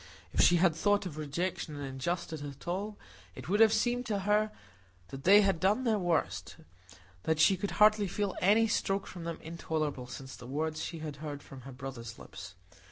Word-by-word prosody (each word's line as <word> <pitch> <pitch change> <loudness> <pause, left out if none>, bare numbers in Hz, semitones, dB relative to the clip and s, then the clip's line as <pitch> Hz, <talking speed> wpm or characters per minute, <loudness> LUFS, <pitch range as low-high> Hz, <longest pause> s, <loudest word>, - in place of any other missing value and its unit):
If - - +3
she 175 - +6
had 175 -1 +4
thought 205 +5 +2
of 170 -5 -5
rejection 155 +1 -3
and 145 -1 -5
injustice 155 +4 -3
at 140 +1 -9
all, 200 +4 -3 0.4
it - - -9
would 205 +3 +1
have 225 -1 +7
seemed 240 +3 +1
to 205 -3 -1
her 210 +2 +2 0.6
that 135 0 -9
they 200 +3 +8
had 195 -4 +2
done 205 +8 +2
their 220 -4 +2
worst; 175 -3 -1 0.7
that 160 - 0
she 190 +4 +6
could 195 +2 -3
hardly 210 -1 +5
feel 200 +1 -2
any 215 +4 +5
stroke 195 -2 0
from 175 -2 -8
them 165 -1 -3
intolerable 155 -5 -3
since 130 +1 -8
the 120 - -11
words 155 +3 -2
she 170 - -5
had 150 -2 -6
heard 145 -1 -6
from 135 -2 -11
her 135 +2 -10
brother's 125 -3 -7
lips. 95 -2 -10
170 Hz, 195 wpm, -31 LUFS, 145-205 Hz, 0.7 s, they